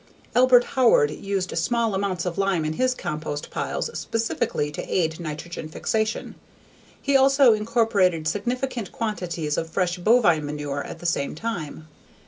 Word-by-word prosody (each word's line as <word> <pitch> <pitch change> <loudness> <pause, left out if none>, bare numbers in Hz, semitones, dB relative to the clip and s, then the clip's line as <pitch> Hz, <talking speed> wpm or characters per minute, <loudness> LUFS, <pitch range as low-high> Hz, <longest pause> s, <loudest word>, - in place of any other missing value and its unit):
Albert 250 0 +6
Howard 235 - +3
used 195 +1 -3
small 235 -3 +1
amounts 190 -3 -1
of 180 0 -3
lime 195 -5 +1
in 155 - -1
his 255 +8 +1
compost 155 -5 -5
piles - - -2
specifically 225 -9 -1
to - - -5
aid 160 -2 0
nitrogen 160 0 -6
fixation. 220 +6 -2 0.7
He 280 0 0
also 270 -2 +6
incorporated 210 -7 +1
significant 240 +3 -2
quantities 175 -9 -2
of 165 - -5
fresh 180 0 -1
bovine 175 -6 +4
manure 145 -1 -4
at - - -8
the - - -12
same 150 -5 0
time. 160 -7 -5
185 Hz, 140 wpm, -24 LUFS, 160-230 Hz, 0.7 s, Albert